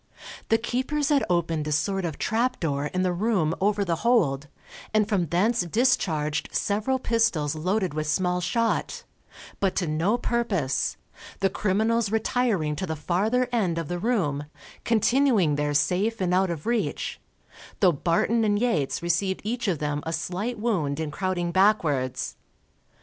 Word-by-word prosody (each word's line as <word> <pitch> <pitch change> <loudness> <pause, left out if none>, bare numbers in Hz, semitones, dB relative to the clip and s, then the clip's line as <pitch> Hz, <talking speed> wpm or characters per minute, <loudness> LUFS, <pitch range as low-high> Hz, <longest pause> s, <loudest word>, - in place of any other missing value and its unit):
The 225 - +5
keepers 260 +5 -1
had 290 -2 +3
opened 165 -3 0
a - - -2
sort 195 +5 0
of 160 -4 -4
trap 240 +3 0
door 145 -3 -1
in 185 +4 -1
the 180 -1 +1
room 180 -5 +1
over 205 0 +2
the 170 -2 0
hold, 160 - +2 0.5
and 215 -1 +3
from 195 -6 0
thence 200 +9 +2
discharged 175 - 0
several 215 +6 0
pistols 225 - +1
loaded 185 +3 -1
with 155 0 -2
small 180 +2 0
shot, 230 +6 -1 0.6
but 195 -2 +1
to 180 - 0
no 165 +9 +1
purpose, 205 - -1 0.4
the 195 -1 +1
criminals 215 +3 +1
retiring 220 -8 0
to 185 - -3
the 160 - -2
farther 210 +11 0
end 190 -9 0
of 165 -3 -3
the 175 0 -2
room, 170 - 0 0.4
continuing 230 - +3
there 145 0 -1
safe 185 +10 +1
and 180 -2 0
out 190 0 +3
of 165 -3 -5
reach; 235 -1 -1 0.6
though 185 -3 +5
Barton 170 +9 +1
and 205 -1 +2
Yates 175 - 0
received 185 +3 0
each 235 +3 -2
of 180 -5 +1
them 145 0 -2
a 165 - -3
slight 185 +9 -3
wound 175 -11 -1
in 155 -2 -3
crowding 180 0 -2
backwards. 160 -10 +1
185 Hz, 155 wpm, -25 LUFS, 160-225 Hz, 0.6 s, The